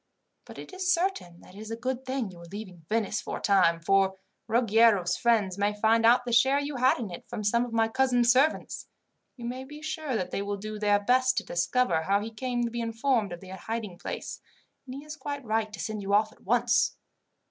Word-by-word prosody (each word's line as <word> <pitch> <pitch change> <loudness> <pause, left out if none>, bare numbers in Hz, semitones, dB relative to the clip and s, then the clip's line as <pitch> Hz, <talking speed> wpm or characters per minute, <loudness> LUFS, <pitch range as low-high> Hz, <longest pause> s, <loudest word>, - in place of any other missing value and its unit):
But - - -12
it - - -10
is 370 -1 0
certain 340 - -1
that - - -16
it 200 - -12
is 215 0 -8
a 225 - -3
good 255 +2 -4
thing 260 -6 -2
you 175 - -13
are 170 - -11
leaving 180 -3 -10
Venice 215 -1 0
for - - -5
a - - -8
time, 180 -4 +3
for 190 +2 +2 0.3
Ruggiero's 225 -5 +3
friends 210 -5 +1
may 205 +1 0
find 225 +1 +4
out 245 +1 +5
the 240 - -2
share 265 +4 +4
you 285 -1 -4
had 255 +1 +3
in 220 -6 -5
it 175 - -10
from 210 - -5
some 235 +4 +2
of 245 - -9
my 225 -1 +2
cousin's 245 -1 +3
servants. 270 +5 +1 0.5
You 240 - -8
may 250 +2 -4
be 295 +3 -11
sure 310 -4 -3
that 185 -4 -2
they - - -2
will 200 0 -3
do 215 +1 -6
their 205 -1 +3
best 255 +4 +2
to - - +1
discover 175 0 +1
how 195 +4 +1
he 220 +2 -6
came 245 +1 -2
to 235 - -2
be 235 0 -3
informed 230 -2 0
of 175 - -7
the 190 - -12
hiding 195 -1 -5
place, - - -6 0.5
and 255 - -7
he 280 +2 -9
is 305 0 -7
quite 285 -3 -6
right 220 -1 0
to 210 - -9
send 215 -1 -4
you 200 +1 +1
off 215 +1 +2
at - - -22
once." 240 +3 +2
225 Hz, 235 wpm, -28 LUFS, 200-255 Hz, 0.5 s, out